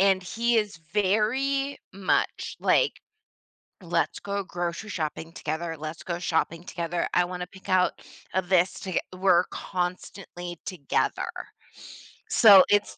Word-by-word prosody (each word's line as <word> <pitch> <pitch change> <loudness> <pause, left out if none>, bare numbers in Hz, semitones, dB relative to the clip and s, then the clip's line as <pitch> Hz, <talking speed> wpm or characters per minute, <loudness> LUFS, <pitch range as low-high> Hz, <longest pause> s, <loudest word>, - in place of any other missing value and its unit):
and 190 -1 +4
he 230 +6 0
is 210 -6 0
very 260 +8 +1
much 190 -1 -1
like, - - +2 0.8
"Let's - - -1
go 200 0 -3
grocery 175 +4 -4
shopping 160 -1 -4
together, 165 +1 -4
let's 155 +2 -6
go 170 -1 -3
shopping 165 0 -1
together, 170 -1 -2
I 180 - +4
wanna 180 0 -5
pick 190 +1 -14
out, 185 -1 +3 0.4
uh, 185 - +2
this 180 0 +2
toge" 185 -2 -3 0.2
We're 185 -2 +4
constantly 175 -1 -5
together. 170 -7 -1 1.0
So 200 -5 +9
it's 200 - +2
185 Hz, 125 wpm, -26 LUFS, 170-200 Hz, 1.0 s, So